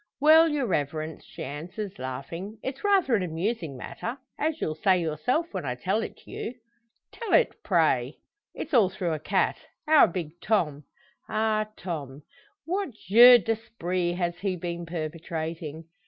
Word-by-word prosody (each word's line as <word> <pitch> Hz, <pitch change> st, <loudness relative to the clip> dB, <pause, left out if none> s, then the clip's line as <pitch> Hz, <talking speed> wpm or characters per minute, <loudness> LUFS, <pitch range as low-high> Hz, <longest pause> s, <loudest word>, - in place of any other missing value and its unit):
"Well, 320 Hz, +3 st, +7 dB
your 295 Hz, -4 st, 0 dB
reverence," 155 Hz, -, -2 dB
she -, -, -8 dB
answers, 175 Hz, +8 st, -6 dB
laughing, 165 Hz, -, -6 dB
"it's 265 Hz, +1 st, -5 dB
rather 390 Hz, -10 st, +3 dB
an 215 Hz, -, +3 dB
amusing 170 Hz, -, -2 dB
matter 235 Hz, -, -5 dB, 0.2 s
as 315 Hz, +1 st, 0 dB
you'll 155 Hz, -, -1 dB
say 185 Hz, +4 st, +3 dB
yourself, 175 Hz, -, -1 dB
when -, -, -3 dB
I -, -, -2 dB
tell -, -, 0 dB
it -, -, -8 dB
you." 240 Hz, -, -6 dB, 0.6 s
"Tell 460 Hz, -3 st, -4 dB
it, -, -, +5 dB
pray!" -, -, +2 dB, 0.4 s
"It's -, -, -6 dB
all 220 Hz, -7 st, +5 dB
through 180 Hz, -3 st, -2 dB
a 155 Hz, -, -3 dB
cat -, -, +1 dB, 0.3 s
our 310 Hz, -5 st, +7 dB
big 170 Hz, -2 st, -6 dB
Tom." 150 Hz, -10 st, 0 dB, 0.4 s
"Ah, 215 Hz, 0 st, +1 dB
Tom! 150 Hz, -6 st, -6 dB, 0.4 s
What 365 Hz, -, -2 dB
jeu 235 Hz, +5 st, +8 dB
d'esprit 185 Hz, -5 st, -2 dB
has 175 Hz, -1 st, -2 dB
he 195 Hz, -2 st, -1 dB
been 170 Hz, -1 st, -5 dB
perpetrating?" 160 Hz, -1 st, -5 dB
180 Hz, 150 wpm, -27 LUFS, 160-235 Hz, 0.6 s, jeu